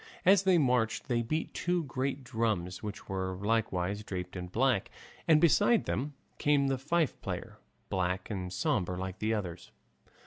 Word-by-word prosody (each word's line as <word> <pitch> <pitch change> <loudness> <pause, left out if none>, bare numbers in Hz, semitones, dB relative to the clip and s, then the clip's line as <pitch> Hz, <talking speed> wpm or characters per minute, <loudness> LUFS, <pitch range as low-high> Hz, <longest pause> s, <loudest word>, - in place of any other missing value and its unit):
As 190 +1 +7
they 190 -2 +4
marched 125 -5 +1
they 120 -1 +2
beat 155 +8 -2
two 175 -1 0
great 135 0 -2
drums 110 -7 -1
which 105 -1 -6
were 95 -1 -2
likewise 100 -2 0
draped 90 -3 -5
in 90 -1 -4
black, 120 +2 +1 0.4
and 155 -2 +6
beside 205 +8 +4
them 140 +3 -2 0.2
came 145 -2 +3
the 135 -1 0
fife 155 +2 0
player, - - -5 0.3
black 90 +2 -1
and 90 -3 -3
sombre 90 - 0
like 95 0 -5
the 110 +1 +1
others. 90 -4 -5
115 Hz, 160 wpm, -31 LUFS, 95-145 Hz, 0.4 s, As